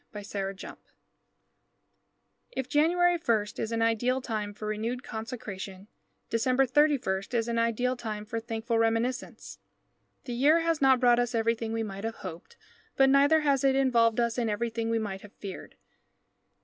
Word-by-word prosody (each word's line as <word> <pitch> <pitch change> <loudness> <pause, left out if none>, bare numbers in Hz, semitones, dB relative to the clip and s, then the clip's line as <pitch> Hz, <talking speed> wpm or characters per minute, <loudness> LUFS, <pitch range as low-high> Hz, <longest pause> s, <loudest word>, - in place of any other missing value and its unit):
DECEMBER 200 -2 -4
31 - - -9 1.8
If 265 - -3
January 345 +4 +3
1 220 -3 +2
is 225 - -3
an 225 0 0
ideal 240 +3 +1
time 215 -5 -3
for 210 +1 -9
renewed 225 +4 -3
consecration, 210 -4 -7 0.4
December 255 +3 +2
31 260 -9 +2
is 230 -1 +1
an 230 0 0
ideal 230 +2 +1
time 215 -3 -5
for 230 +1 -3
thankful 225 0 -2
reminiscence. 230 +4 -1 0.6
The 245 - -5
year 295 +7 +4
has 330 -2 0
not 265 -2 +5
brought 240 -1 +4
us 245 0 -1
everything 230 0 0
we 225 0 -1
might 195 -1 -6
have 225 0 -3
hoped, 180 - -9 0.4
but 270 0 +5
neither 285 +3 +5
has 280 -3 +2
it 270 -1 +3
involved 235 -4 +3
us 235 0 0
in 230 -2 0
everything 230 +1 -2
we 230 - +1
might 200 -3 -4
have 210 - -14
feared. 195 -2 -9
230 Hz, 160 wpm, -28 LUFS, 220-260 Hz, 1.8 s, not